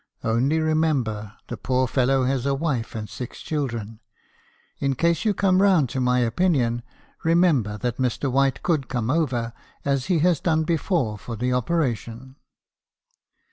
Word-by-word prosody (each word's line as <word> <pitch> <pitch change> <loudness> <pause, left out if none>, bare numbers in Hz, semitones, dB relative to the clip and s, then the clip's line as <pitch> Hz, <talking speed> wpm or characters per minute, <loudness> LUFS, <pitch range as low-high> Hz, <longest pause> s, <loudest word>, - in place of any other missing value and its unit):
Only 125 +8 +1
remember 140 -10 0
the - - -5
poor 130 0 +1
fellow 130 +1 +2
has 130 0 0
a 140 - +2
wife 135 -7 -2
and 105 -1 -4
six 110 +4 -7
children. 115 -8 -4 0.8
In 140 -1 0
case 170 - +1
you 210 -2 +2
come 190 -1 +3
round 180 -10 +4
to 130 - -2
my 125 0 +2
opinion, 120 -2 +1 0.4
remember 160 - +3
that 120 +2 -2
Mr. 130 +1 0
White 135 0 +1
could 155 -6 0
come 120 -1 -1
over, 125 -7 0 0.3
as 140 -2 0
he 180 -3 +2
has 175 -5 +3
done 160 -2 +1
before, 155 - 0
for 115 - -6
the 125 +3 -1
operation.' 125 - -2
130 Hz, 150 wpm, -24 LUFS, 120-160 Hz, 0.8 s, round